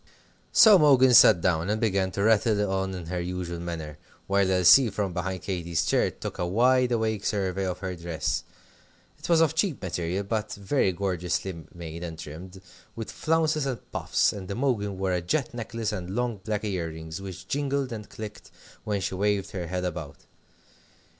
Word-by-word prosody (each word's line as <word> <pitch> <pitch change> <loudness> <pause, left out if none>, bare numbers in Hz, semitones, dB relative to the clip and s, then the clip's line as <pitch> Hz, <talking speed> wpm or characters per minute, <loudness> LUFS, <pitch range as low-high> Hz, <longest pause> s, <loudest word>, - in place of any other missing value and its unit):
So 215 -3 +8
Imogen 135 -5 +5
sat 105 -6 +8
down 85 0 +1
and 105 +1 0
began 100 -4 +1
to 100 - -1
rattle 105 -2 +3
on 95 0 -1
in 90 -2 -7
her 90 +2 -3
usual 90 -1 -4
manner, 80 -3 -6 0.3
while 100 -1 +2
Elsie, 95 +7 +6
from 100 -3 -3
behind 95 +1 -3
Katy's 85 -3 -2
chair, - - +2
took - - -7
a 90 - 0
wide 125 +6 +3
awake 110 -3 0
survey 95 -2 -1
of 90 -1 -3
her 95 -2 -4
dress. 85 -2 -2 0.8
It - - -8
was 165 -1 +5
of 160 -1 +3
cheap 160 -1 0
material, 90 +1 -2
but 105 +1 -3
very 100 +1 +1
gorgeously 90 -2 -3
made 85 0 -7
and 80 -2 -6
trimmed, 90 +6 -9 0.3
with 115 -1 -6
flounces 155 -3 +1
and 130 -3 -6
puffs, - - +1
and 95 -3 -8
Imogen 105 -4 -1
wore 95 -1 -1
a 90 - 0
jet 125 - -1
necklace 115 -1 -3
and 95 -2 -5
long 120 -2 -1
black 105 +1 -3
ear 95 -5 -2
rings, 80 +2 -8
which 95 -1 -8
jingled 140 -1 -1
and 105 -2 -7
clicked 105 -1 -9 0.3
when 105 -2 -2
she 95 - -2
waved 100 +1 0
her 90 -3 -4
head 90 +1 -3
about. 80 -5 -5
95 Hz, 180 wpm, -26 LUFS, 90-115 Hz, 0.8 s, So